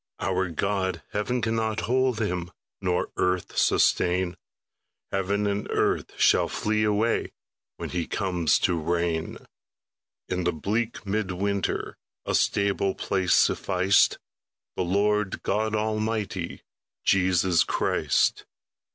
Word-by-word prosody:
Our 95 -1 0
God, 95 +2 -1
heaven 115 +3 -1
cannot 110 -1 0
hold 130 -1 +1
Him, 90 -5 -2 0.3
Nor 90 -2 0
earth 90 -1 0
sustain; 90 0 +2 0.8
Heaven 100 +2 0
and 100 0 -2
earth - - -1
shall - - +4
flee 110 0 0
away 105 +2 +1 0.4
When - - -5
He 85 -2 -2
comes 90 -5 +1
to 85 - +1
reign: 85 0 -1 0.9
In 90 0 -2
the 90 0 +1
bleak 110 +9 -2
mid 100 0 -1
winter 100 +1 -2 0.3
A - - -2
stable 100 -1 +1
place 95 -3 +1
sufficed 95 +1 +3 0.6
The - - -2
Lord 100 +2 0
God 110 +2 0
Almighty, 110 -4 -2 0.4
Jesus 90 -2 +3
Christ. - - +1
95 Hz, 110 wpm, -26 LUFS, 90-105 Hz, 0.9 s, shall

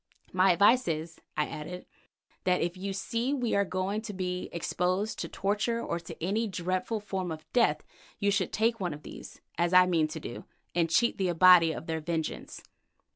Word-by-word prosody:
"My 185 0 +5
advice 215 +8 +4
is," 160 0 -3 0.2
I 150 - +2
added, 175 +5 -7 0.6
"that 180 -1 +2
if 175 +1 -1
you 195 +2 -4
see 230 +7 -1
we 245 -4 -1
are 200 - +3
going 190 +2 -2
to 215 -2 -7
be 180 -1 -3
exposed 180 +4 -1
to - - -4
torture 210 +4 -1
or 170 -7 -3
to 165 - -10
any 215 +6 0
dreadful 185 +3 -2
form 190 -4 -4
of 155 -1 -7
death, 245 -2 +3 0.3
you 200 -1 +1
should 195 -2 0
take 225 +1 +1
one 175 -5 -2
of 150 - -14
these, - - -11 0.2
as 175 +1 +1
I 180 0 +8
mean 165 -4 +2
to 155 +1 -6
do, 135 - -8 0.3
and 170 -1 +1
cheat 235 +8 +2
the 190 - +1
Abati 175 -1 +7
of 160 - -6
their 160 -1 -2
vengeance." 160 0 -4
185 Hz, 190 wpm, -29 LUFS, 170-205 Hz, 0.6 s, I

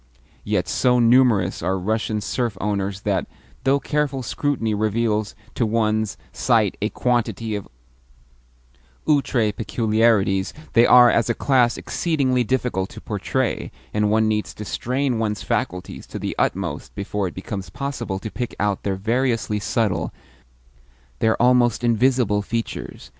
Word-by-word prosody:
Yet, 100 -4 0
so 125 +8 +2
numerous 115 -6 +4
are 95 +3 0
Russian 110 +2 -1
serf 115 -1 -2
owners 100 -1 -2
that, 100 -2 -1 0.4
though 135 +1 +4
careful 145 -3 -1
scrutiny 120 -3 -1
reveals 110 0 0 0.2
to - - 0
one's 110 -1 0 0.2
sight - - +2
a - - +1
quantity 115 -3 -1
of 100 - -5 1.4
outre 135 -7 +2
peculiarities, 105 -3 +1 0.2
they 120 +1 +6
are, 125 -1 +8
as 115 0 +1
a 120 - +1
class, 125 -4 +2
exceedingly 135 -7 0
difficult 120 -6 -1
to - - -10
portray, 110 +3 -2 0.2
and 105 0 +2
one 110 +1 +3
needs 105 -1 -1
to 105 - -7
strain 125 +2 -1
one's 105 -2 -2
faculties 90 +1 -3
to - - -7
the - - -4
utmost - - -2
before 100 0 -2
it 90 - -8
becomes 95 0 -6
possible 120 -8 -4
to 105 +2 -6
pick 120 -1 -4
out 100 -1 0
their 100 -1 -1
variously 115 +1 0
subtle, 100 -6 0 1.1
their 110 0 +2
almost 120 -1 +3
invisible, 120 -2 +2
features. 115 +2 -5
110 Hz, 135 wpm, -22 LUFS, 105-125 Hz, 1.4 s, are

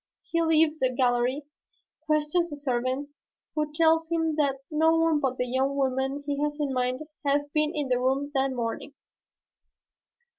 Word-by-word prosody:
He 335 - +2
leaves 320 -1 +3
the 260 - +2
gallery, 250 +2 +1 0.6
questions 305 +3 +1
a 290 - -6
servant, 260 +1 -2 0.4
who 300 -1 -1
tells 325 +1 +3
him 325 -2 0
that 280 -3 +1
no 320 +1 +3
one 325 -2 +3
but 260 -2 -1
the 250 - 0
young 265 +3 0
woman 270 +1 -1
he 285 0 -2
has 295 0 -1
in 285 -3 -1
mind 255 +1 -1 0.2
has 285 0 +1
been 305 +1 +1
in 295 -2 -1
the 250 -1 +2
room 270 +3 0
that 270 -1 +1
morning." 245 +3 -4
285 Hz, 160 wpm, -27 LUFS, 260-305 Hz, 0.6 s, leaves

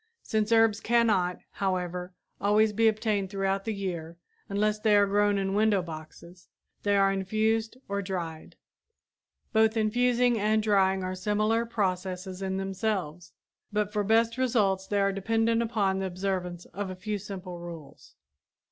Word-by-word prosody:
Since 215 0 -1
herbs 225 -2 +4
cannot, 210 -6 +2
however, 180 -1 -3 0.2
always 210 +1 +3
be 225 +2 +3
obtained 215 -3 0
throughout 195 0 -1
the 225 - -1
year, 175 -5 -5 0.3
unless 210 +1 0
they 210 -1 +3
are 205 0 +6
grown 205 0 +2
in 195 0 -1
window 205 -2 +3
boxes, 170 +2 -11 0.3
they 205 -1 +2
are 195 0 +4
infused 220 +4 0
or 200 0 -2
dried. 170 -5 -5 1.0
Both 220 0 +3
infusing 245 +2 +2
and 215 +1 +2
drying 195 -3 +2
are 185 0 -2
similar 215 +4 0
processes 185 -3 -2
in 190 0 -2
themselves, 190 -4 -3 0.4
but 210 0 -1
for 210 -1 +1
best 230 +3 +2
results 200 -7 +1
they 205 0 0
are 195 0 +2
dependent 225 +3 +1
upon 205 -4 0
the 190 - -1
observance 180 -1 -3
of 200 +1 -4
a 185 - -5
few 205 +3 -4
simple 185 -3 -7
rules. 170 -4 -11
200 Hz, 145 wpm, -28 LUFS, 185-220 Hz, 1.0 s, are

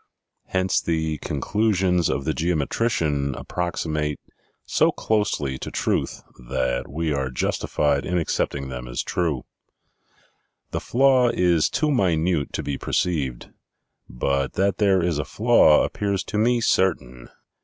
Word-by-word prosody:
Hence, 95 0 +1
the 80 -2 -1
conclusions 90 +2 +1
of 70 - -2
the 80 - 0
geometrician 80 - 0
approximate 75 -4 -3 0.5
so - - +3
closely 75 -11 -1
to - - -5
truth - - -2 0.2
that 65 0 -2
we 80 +2 -2
are 65 -2 -1
justified 70 +2 0
in 90 - -1
accepting 70 -4 -1
them 60 -1 -6
as - - -3
true. 80 -8 -1 1.3
The - - -2
flaw 130 -1 +3
is 90 -6 +2
too 155 0 0
minute 85 - +1
to - - -3
be 70 -1 -3
perceived. 70 -9 -2 0.6
But 70 +3 -1
that 95 0 0
there 95 -4 +3
is 85 -4 0
a - - 0
flaw 110 - +4
appears 100 -2 -2
to 105 - -3
me 120 +2 +2
certain. 65 - 0
80 Hz, 130 wpm, -23 LUFS, 70-95 Hz, 1.3 s, flaw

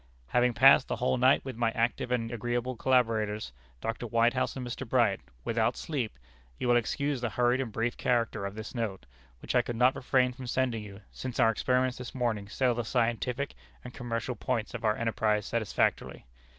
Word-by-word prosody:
"Having 125 0 +2
passed 130 +2 +7
the - - -1
whole 125 +1 0
night 130 +2 +4
with 130 -3 -5
my 115 0 +1
active 120 +1 -1
and 115 -2 0
agreeable 120 +2 -2
collaborators, 110 - +1 0.3
Dr. 115 +2 -3
Whitehouse 115 +2 +1
and 130 -2 -5
Mr. 120 0 -6
Bright, 115 -6 +3 0.2
without 115 +3 0
sleep, 130 - -3 0.4
you - - -2
will 120 - +5
excuse 140 +3 0
the 120 - -1
hurried 125 +3 +2
and 120 -4 -4
brief 115 +3 -1
character 115 -4 0
of 100 - -8
this 110 0 -7
note, 110 - -3 0.4
which - - -3
I 125 - +5
could 120 0 -5
not 125 +3 +4
refrain 125 0 +2
from 125 0 -8
sending 125 -2 0
you, 100 -1 -10
since 130 -2 -6
our 115 - +5
experiments 125 +2 0
this 125 +1 -7
morning 110 -5 -1
settle 125 +4 +1
the 120 0 -2
scientific 120 +3 -1 0.3
and 125 - -9
commercial 120 0 -3
points 115 0 -2
of 125 -1 -6
our 105 -1 +2
enterprise 110 -2 0
satisfactorily. 110 - -1
120 Hz, 190 wpm, -29 LUFS, 115-125 Hz, 0.4 s, passed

